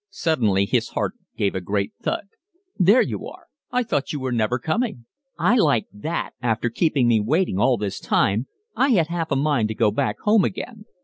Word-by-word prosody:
Suddenly 115 Hz, -, +1 dB
his 100 Hz, -, 0 dB
heart -, -, -2 dB, 0.2 s
gave 100 Hz, -1 st, +1 dB
a 95 Hz, -, -3 dB
great 100 Hz, +2 st, -2 dB
thud. -, -, -2 dB, 0.5 s
"There 200 Hz, +7 st, +6 dB
you -, -, -5 dB
are. -, -, -12 dB, 0.2 s
I 250 Hz, 0 st, +1 dB
thought 145 Hz, -, -2 dB
you 150 Hz, -, -3 dB
were 130 Hz, -1 st, -3 dB
never 115 Hz, +1 st, +1 dB
coming." 155 Hz, -, -2 dB, 0.3 s
"I 245 Hz, -, +3 dB
like 145 Hz, -, +3 dB
that 155 Hz, +12 st, -3 dB
after 120 Hz, 0 st, 0 dB
keeping 140 Hz, -2 st, +2 dB
me 115 Hz, -2 st, +4 dB
waiting 120 Hz, -, 0 dB
all 125 Hz, +2 st, +3 dB
this 100 Hz, -2 st, -4 dB
time. 110 Hz, +6 st, +1 dB, 0.3 s
I 270 Hz, +3 st, +2 dB
had 170 Hz, -6 st, +2 dB
half 170 Hz, -1 st, -2 dB
a 140 Hz, -, +1 dB
mind 135 Hz, -5 st, +1 dB
to 110 Hz, -, -5 dB
go 110 Hz, -2 st, +2 dB
back 105 Hz, -, -1 dB
home 210 Hz, -1 st, +4 dB
again." 210 Hz, +2 st, -5 dB
135 Hz, 195 wpm, -23 LUFS, 110-175 Hz, 0.5 s, There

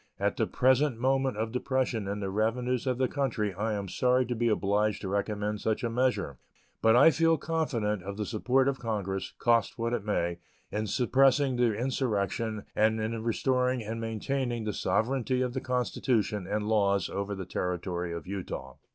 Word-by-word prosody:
At -, -, +1 dB
the -, -, 0 dB
present 130 Hz, 0 st, +3 dB
moment 130 Hz, 0 st, +1 dB
of 110 Hz, +1 st, -2 dB
depression 125 Hz, -4 st, -1 dB
in 100 Hz, +1 st, -3 dB
the 95 Hz, -1 st, -2 dB
revenues 120 Hz, +5 st, 0 dB
of 125 Hz, -1 st, +1 dB
the 130 Hz, 0 st, +2 dB
country 115 Hz, -8 st, -1 dB
I 105 Hz, +4 st, -1 dB
am 100 Hz, -1 st, -3 dB
sorry 125 Hz, +5 st, +2 dB
to 120 Hz, +1 st, -3 dB
be 120 Hz, +1 st, +1 dB
obliged 105 Hz, 0 st, +1 dB
to -, -, -4 dB
recommend 105 Hz, +1 st, -2 dB
such 110 Hz, +1 st, -1 dB
a 115 Hz, -, -1 dB
measure; 115 Hz, -, 0 dB, 0.4 s
but 110 Hz, +1 st, +5 dB
I 140 Hz, +6 st, +8 dB
feel 165 Hz, +2 st, +3 dB
confident 125 Hz, -, -1 dB
of 100 Hz, +2 st, -6 dB
the 105 Hz, -, -2 dB
support 130 Hz, +5 st, +1 dB
of 140 Hz, -1 st, 0 dB
Congress, 100 Hz, -4 st, -3 dB
cost 115 Hz, -2 st, +2 dB
what 115 Hz, 0 st, -1 dB
it 115 Hz, -, -1 dB
may, 85 Hz, -5 st, -1 dB, 0.3 s
in 105 Hz, +1 st, -2 dB
suppressing 135 Hz, +4 st, +3 dB
the 120 Hz, -3 st, +2 dB
insurrection 110 Hz, -3 st, -1 dB
and 110 Hz, +1 st, +3 dB
in 110 Hz, +1 st, -2 dB
restoring 125 Hz, +2 st, +1 dB
and 115 Hz, +2 st, -4 dB
maintaining 120 Hz, +2 st, -2 dB
the 105 Hz, -1 st, -2 dB
sovereignty 125 Hz, +7 st, 0 dB
of 125 Hz, -1 st, -2 dB
the 130 Hz, -, -2 dB
Constitution 120 Hz, -5 st, 0 dB
and 105 Hz, +1 st, -1 dB
laws 100 Hz, -3 st, +2 dB
over 100 Hz, +1 st, -3 dB
the 95 Hz, -1 st, -6 dB
Territory 90 Hz, -1 st, -3 dB
of 85 Hz, 0 st, -5 dB
Utah. 90 Hz, -9 st, -6 dB
110 Hz, 180 wpm, -29 LUFS, 100-125 Hz, 0.4 s, I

